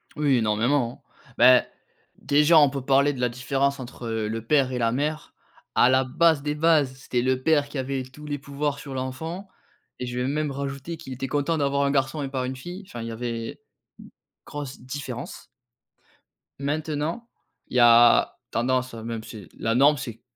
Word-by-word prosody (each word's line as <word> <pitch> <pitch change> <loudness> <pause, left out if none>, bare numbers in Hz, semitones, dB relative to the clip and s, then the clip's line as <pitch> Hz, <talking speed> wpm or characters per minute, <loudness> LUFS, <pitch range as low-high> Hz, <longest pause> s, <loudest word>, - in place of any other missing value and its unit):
Oui 145 -3 +2
énormément. 115 +3 0 0.3
Bah, 125 +1 +7 0.6
déjà 150 +3 +4
on 145 -2 +6
peut 140 0 -4
parler 140 +1 +4
de 130 - -8
la 125 - +2
différence 135 +3 -1
entre 120 -1 -8
le 110 0 -3
père 135 0 +3
et 125 - -2
la 115 -2 +1
mère. 150 +5 -2 0.4
À 125 - +6
la 130 0 +3
base 160 +2 +3
des 150 +1 -2
bases, 150 -4 +3
c'était 130 -2 -2
le 130 +1 0
père 150 -2 +3
qui 145 - -7
avait 135 0 -2
tous 130 +4 -13
les 145 -1 -3
pouvoirs 140 +1 -3
sur 140 -2 -8
l'enfant 160 +9 -5 0.5
et 125 - -3
je 125 0 -5
vais 125 +1 0
même 150 +1 -1
rajouter 140 +3 -5
qu'il 135 - -10
était 130 +1 -4
content 145 +4 0
d'avoir 140 -1 +1
un 140 - +1
garçon 135 +2 0
et 135 - -4
pas 130 -2 -2
une 130 +1 -4
fille, 175 +9 -8
enfin 120 -8 -7
il 115 - -5
y - - -5
avait, 115 0 -4
une - - -15 0.9
grosse 145 -2 -7
différence. 125 -2 -7 1.1
Maintenant 155 +8 -2 0.4
il - - -3
y - - +5
a 120 0 +6
tendance, 130 +1 0
même 115 0 -5
c'est 105 -5 -10
la 115 0 0
norme 145 +4 +5
c'est 125 - -5
c - - -27
135 Hz, 190 wpm, -25 LUFS, 125-145 Hz, 1.1 s, Bah